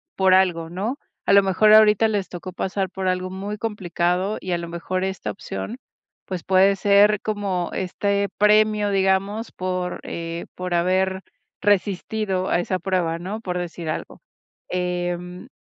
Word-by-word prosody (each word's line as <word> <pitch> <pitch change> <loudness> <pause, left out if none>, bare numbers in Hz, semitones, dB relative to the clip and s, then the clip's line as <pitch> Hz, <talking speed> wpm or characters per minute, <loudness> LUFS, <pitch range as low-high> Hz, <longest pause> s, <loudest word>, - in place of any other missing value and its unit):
por 190 -1 +4
algo, 175 -3 +3
¿no?, 215 +10 -3 0.3
a - - +3
lo 200 0 +7
mejor 210 +3 +4
ahorita 215 0 +6
les 205 -3 -2
tocó 180 +1 -7
pasar 190 +1 -2
por 190 0 -2
algo 185 0 -1
muy 200 +3 -5
complicado 185 -2 -1
y 185 - -3
a 175 - +1
lo 170 0 -6
mejor 185 +2 -3
esta 190 0 -3
opción, 215 +3 -5 0.5
pues, 180 -4 -5
puede 190 +1 +4
ser 205 +1 +5
como 200 -5 -2
este 200 +2 -1
premio, 210 0 +4
digamos, 195 +3 +1
por, 185 -1 -3
eh, 170 0 -5
por 180 -1 -4
haber 190 +2 +1 0.4
resistido 200 -1 0
a 175 - +2
esa 185 +1 -2
prueba, 175 -2 -1
¿no?, 200 +5 -5
por 180 -4 -3
decir 170 -2 -5
algo, 155 - -5 0.5
em, 180 0 -3
190 Hz, 155 wpm, -23 LUFS, 180-205 Hz, 0.5 s, lo